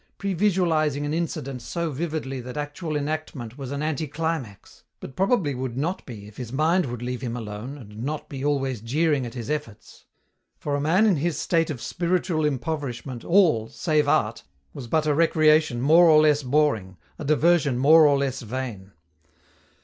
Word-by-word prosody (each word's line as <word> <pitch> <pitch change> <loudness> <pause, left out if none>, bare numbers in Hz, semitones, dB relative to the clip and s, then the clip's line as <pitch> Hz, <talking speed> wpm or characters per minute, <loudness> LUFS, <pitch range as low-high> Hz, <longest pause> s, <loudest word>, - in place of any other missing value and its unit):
previsualizing 170 -7 +1
an 145 - -2
incident 140 -6 -3
so 170 +5 -3
vividly 145 -3 -4
that 125 +4 -8
actual 150 +2 -4
enactment 145 -5 -4
was 135 -2 -7
an 140 +1 -3
anticlimax 155 -6 -4 0.2
but 130 - -10
probably 195 - +1
would 130 -1 -4
not 170 +7 -2
be 105 -5 -9
if 105 - -15
his 125 -3 -6
mind 155 +4 +2
would 120 -1 -6
leave 125 -1 -4
him 120 -1 -4
alone 110 +5 -6
and 105 -4 -11
not 150 +3 -4
be 135 -1 -7
always 135 -5 -1
jeering 140 +2 0
at 115 - -10
his 115 -3 -6
efforts. 150 -8 -6 0.5
For 145 - -4
a 145 - -1
man 175 +9 +3
in 200 -6 +3
his 165 +2 -1
state 165 -2 +1
of 145 -6 -4
spiritual 175 0 0
impoverishment 135 -4 -3
all, 165 - +3
save 150 0 0
art, - - +1 0.3
was 125 - -8
but 155 +5 +1
a 150 - +2
recreation 155 -4 +3
more 165 +5 +6
or 155 -1 +7
less 150 -1 +3
boring, 125 -9 0 0.2
a - - -5
diversion 155 -2 +3
more 155 +4 +7
or 140 -1 +3
less 135 -2 -2
vain. 115 -5 -6
145 Hz, 170 wpm, -24 LUFS, 125-160 Hz, 0.5 s, or